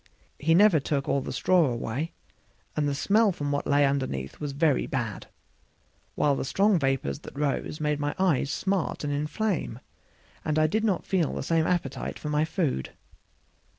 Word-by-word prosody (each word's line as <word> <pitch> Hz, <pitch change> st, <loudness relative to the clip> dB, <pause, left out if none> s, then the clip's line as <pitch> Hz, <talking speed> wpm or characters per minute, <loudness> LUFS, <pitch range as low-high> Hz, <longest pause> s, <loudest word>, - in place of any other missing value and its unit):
He 165 Hz, +2 st, +3 dB
never 195 Hz, -3 st, +6 dB
took 140 Hz, 0 st, -2 dB
all 140 Hz, -, +1 dB
the -, -, -5 dB
straw 180 Hz, -3 st, +3 dB
away, 125 Hz, +6 st, -3 dB, 0.6 s
and 145 Hz, -1 st, +1 dB
the 140 Hz, -, -1 dB
smell 210 Hz, +8 st, +3 dB
from 145 Hz, -4 st, -3 dB
what 145 Hz, -, -1 dB
lay 145 Hz, 0 st, +4 dB
underneath 130 Hz, -, -2 dB
was 145 Hz, -2 st, -3 dB
very 145 Hz, 0 st, +1 dB
bad; 120 Hz, -7 st, -3 dB, 0.9 s
while 145 Hz, -2 st, +2 dB
the -, -, -2 dB
strong 195 Hz, +7 st, +3 dB
vapors 135 Hz, -, -1 dB
that -, -, -11 dB
rose 150 Hz, +1 st, -1 dB
made 150 Hz, -1 st, 0 dB
my 145 Hz, 0 st, -2 dB
eyes 175 Hz, -7 st, +2 dB
smart 190 Hz, +2 st, -1 dB
and 145 Hz, -1 st, -1 dB
inflame, 150 Hz, -, -2 dB, 0.6 s
and 155 Hz, 0 st, -1 dB
I 155 Hz, -, +4 dB
did 215 Hz, +8 st, 0 dB
not 200 Hz, -5 st, 0 dB
feel 180 Hz, -6 st, 0 dB
the -, -, -3 dB
same 160 Hz, +2 st, +1 dB
appetite 165 Hz, -7 st, -2 dB
for 150 Hz, -, -5 dB
my 150 Hz, +1 st, +2 dB
food. 160 Hz, -, -2 dB
150 Hz, 175 wpm, -27 LUFS, 140-170 Hz, 0.9 s, never